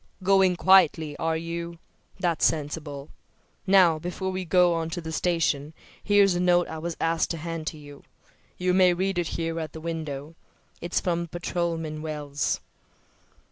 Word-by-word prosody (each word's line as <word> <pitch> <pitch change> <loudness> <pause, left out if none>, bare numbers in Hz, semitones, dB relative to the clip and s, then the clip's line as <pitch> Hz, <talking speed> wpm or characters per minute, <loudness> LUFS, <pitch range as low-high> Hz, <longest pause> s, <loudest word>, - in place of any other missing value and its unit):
Going 190 -1 +4
quietly, 165 -5 +4
are 160 -1 0
you? 170 +1 -5 0.4
That's 175 -3 0
sensible. 145 -2 -1 0.6
Now, 185 -5 +5
before 180 +3 -4
we 185 0 -4
go 180 0 +4
on 165 -1 -2
to 175 +2 -4
the 160 -1 -6
station 160 -3 0 0.3
here's 200 -2 +4
a 175 - -1
note 175 -1 +3
I 160 - -6
was 170 +1 -5
asked 165 0 +1
to 165 - -3
hand 165 0 -4
you. 145 -2 -13 0.6
You 180 0 +1
may 180 -1 +5
read 190 0 -1
it 175 - -1
here 165 0 -2
at 155 -2 -5
the 160 - -7
window. 155 -2 -5 0.5
It's 175 +1 -1
from 170 -1 -1
Patrolman 165 -2 -3
Wells." 150 -2 -2
165 Hz, 155 wpm, -26 LUFS, 160-180 Hz, 0.6 s, Now